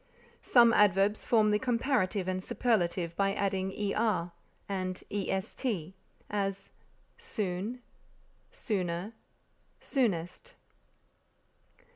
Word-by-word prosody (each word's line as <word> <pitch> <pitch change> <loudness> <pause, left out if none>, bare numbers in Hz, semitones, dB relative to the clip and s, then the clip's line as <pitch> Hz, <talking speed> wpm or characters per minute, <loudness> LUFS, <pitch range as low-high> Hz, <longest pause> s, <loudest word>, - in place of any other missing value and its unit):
Some 235 -2 +6
adverbs 205 0 +3
form 215 -3 +4
the 210 - +3
comparative 230 -6 0
and 185 0 -2
superlative 175 -8 0
by 195 0 +1
adding 190 -1 -1 0.2
er 195 -6 0 0.4
and 185 -2 -3
est; 190 - -2 0.4
as, 195 -1 -2 0.5
soon, 215 - -3 0.7
sooner, 185 -2 -3 0.7
soonest. 190 - -2
195 Hz, 80 wpm, -30 LUFS, 185-225 Hz, 0.7 s, Some